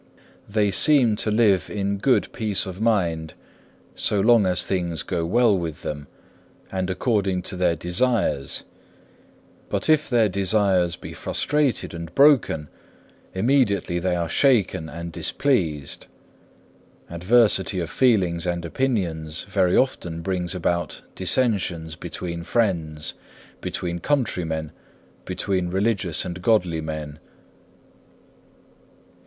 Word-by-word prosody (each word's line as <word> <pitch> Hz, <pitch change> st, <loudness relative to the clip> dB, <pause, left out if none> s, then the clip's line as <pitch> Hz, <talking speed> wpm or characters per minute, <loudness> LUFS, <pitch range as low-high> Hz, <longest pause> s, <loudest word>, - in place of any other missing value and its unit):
They 105 Hz, -1 st, +1 dB
seem 125 Hz, +1 st, +4 dB
to 110 Hz, -, +1 dB
live 105 Hz, -4 st, +3 dB
in 100 Hz, -1 st, -2 dB
good 130 Hz, +4 st, +1 dB
peace 105 Hz, -3 st, -1 dB
of 95 Hz, +1 st, -7 dB
mind 85 Hz, -8 st, 0 dB, 0.6 s
so 105 Hz, -, 0 dB
long 110 Hz, -1 st, +5 dB
as 90 Hz, -1 st, +1 dB
things 85 Hz, -6 st, -2 dB
go 85 Hz, 0 st, -2 dB
well 115 Hz, +2 st, +4 dB
with 85 Hz, -4 st, -4 dB
them, 75 Hz, -1 st, -5 dB, 0.6 s
and 95 Hz, -1 st, -2 dB
according 95 Hz, -2 st, 0 dB
to 95 Hz, -, -1 dB
their 90 Hz, -2 st, +1 dB
desires, 90 Hz, -, 0 dB, 1.1 s
but -, -, -1 dB
if 155 Hz, -1 st, +3 dB
their 120 Hz, -4 st, +3 dB
desires 95 Hz, -2 st, +1 dB
be -, -, -9 dB
frustrated 145 Hz, -, -1 dB
and 85 Hz, 0 st, -8 dB
broken, 135 Hz, -, +4 dB, 0.7 s
immediately 100 Hz, -6 st, +1 dB
they 90 Hz, 0 st, 0 dB
are 85 Hz, -1 st, -1 dB
shaken 100 Hz, -, +2 dB
and 85 Hz, +1 st, -7 dB
displeased. 80 Hz, -, -1 dB, 1.0 s
Diversity 95 Hz, +1 st, +2 dB
of 85 Hz, -2 st, -4 dB
feelings 95 Hz, -9 st, +2 dB
and 85 Hz, -1 st, -2 dB
opinions 85 Hz, -8 st, -2 dB
very 90 Hz, -1 st, +1 dB
often 85 Hz, -11 st, -1 dB
brings 90 Hz, 0 st, -2 dB
about 85 Hz, -3 st, -2 dB
dissensions 95 Hz, -6 st, 0 dB
between 85 Hz, +1 st, -6 dB
friends, 85 Hz, -7 st, -1 dB, 0.5 s
between 85 Hz, -1 st, -3 dB
countrymen, 85 Hz, -, -1 dB, 0.5 s
between 90 Hz, -1 st, -2 dB
religious 95 Hz, -2 st, 0 dB
and 90 Hz, 0 st, -6 dB
godly 90 Hz, -6 st, +2 dB
men. 75 Hz, -1 st, -6 dB
95 Hz, 115 wpm, -23 LUFS, 85-110 Hz, 1.1 s, long